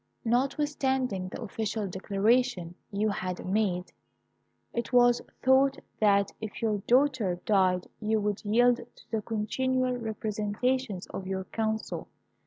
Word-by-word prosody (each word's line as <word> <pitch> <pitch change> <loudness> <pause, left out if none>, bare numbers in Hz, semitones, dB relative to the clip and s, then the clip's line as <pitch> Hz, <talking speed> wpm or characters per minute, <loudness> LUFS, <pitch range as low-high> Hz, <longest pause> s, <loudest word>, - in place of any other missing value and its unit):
"Notwithstanding 265 -5 0
the 235 - -6
official 215 0 -2
declaration 195 0 +1 0.2
you 210 +2 +1
had 185 -3 -3
made, 185 -2 0 0.8
it 235 - -3
was 245 -1 +5 0.2
thought 270 +1 +4 0.2
that 200 -2 +4
if 220 -1 -6
your 215 -2 0
daughter 250 -7 +3
died 185 -3 +3
you 220 0 +1
would 210 -1 -2
yield 240 +3 +4
to 240 0 -15
the 220 -1 0
continual 255 +4 0
representations 220 0 -2
of 190 - -5
your 190 0 -2
council. 220 +2 -3
220 Hz, 120 wpm, -29 LUFS, 200-245 Hz, 0.8 s, was